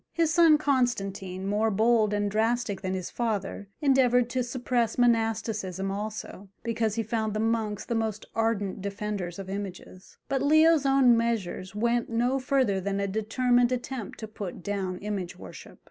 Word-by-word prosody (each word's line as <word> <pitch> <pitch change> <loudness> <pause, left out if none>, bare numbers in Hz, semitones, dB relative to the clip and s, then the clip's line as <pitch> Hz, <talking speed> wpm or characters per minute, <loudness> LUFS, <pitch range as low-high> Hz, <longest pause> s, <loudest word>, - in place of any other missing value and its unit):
His 330 -2 +1
son 330 -3 +6
Constantine, 195 -10 -1
more 210 +3 +1
bold 220 +1 +3
and 205 -1 0
drastic 225 -1 0
than 190 -1 -2
his 185 -2 -5
father, 205 -3 -3
endeavoured 250 -4 +3
to 255 -1 0
suppress 245 -2 -1
monasticism 225 -5 0
also, 205 -1 -6
because 225 -2 -1
he 230 - 0
found 220 -1 -2
the - - 0
monks 220 -2 -1
the - - -2
most 220 -2 -2
ardent 210 -4 -1
defenders 200 -3 -4
of 195 -1 -7
images; 190 -1 -7
but 270 -1 0
Leo's 310 0 +5
own 270 -3 +5
measures 210 -5 -2
went 235 +2 0
no 245 +3 +1
further 255 -7 +1
than 200 +1 -2
a 200 - 0
determined 240 +4 +1
attempt 250 -2 -4
to 220 - -5
put 200 -4 -7
down 190 -1 -2
image 195 -3 -4
worship. - - -11
220 Hz, 160 wpm, -27 LUFS, 200-245 Hz, -, son